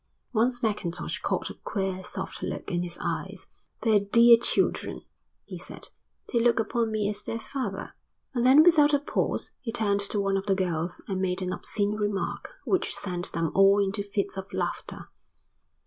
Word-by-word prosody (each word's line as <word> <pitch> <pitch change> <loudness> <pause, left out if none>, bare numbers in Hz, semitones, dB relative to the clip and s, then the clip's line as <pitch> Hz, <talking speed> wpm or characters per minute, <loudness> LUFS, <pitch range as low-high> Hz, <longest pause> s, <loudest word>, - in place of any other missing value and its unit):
Once 245 +2 +1
Mackintosh 190 -6 -2
caught - - -1
a - - -7
queer 190 -2 -3
soft - - -5
look - - -4
in 175 -1 0
his 175 -1 -3
eyes. - - -4 0.4
"They're 220 -3 +4
dear 235 +4 +7
children," 230 - 0 0.4
he - - -8
said. - - -7 0.4
"They 235 - +4
look 235 0 +3
upon 225 +1 0
me 215 -2 0
as 205 0 -2
their 230 - -4
father." 265 +3 -5 0.4
And 240 -2 0
then 270 +5 +8
without 300 -4 +6
a - - +2
pause 290 - -2
he 230 - -4
turned 205 -3 +1
to 200 +1 -2
one 195 -1 +1
of 195 +1 -4
the 195 - +3
girls 175 -2 -2
and 190 -2 -2
made 185 0 0
an 185 - -2
obscene 205 -1 -1
remark 205 -2 -2 0.2
which 375 - +1
sent 180 -2 -3
them 165 -2 -1
all 195 +1 +6
into 200 +1 +1
fits 200 -1 -3
of 190 0 -6
laughter. - - -4
205 Hz, 180 wpm, -27 LUFS, 190-230 Hz, 0.4 s, then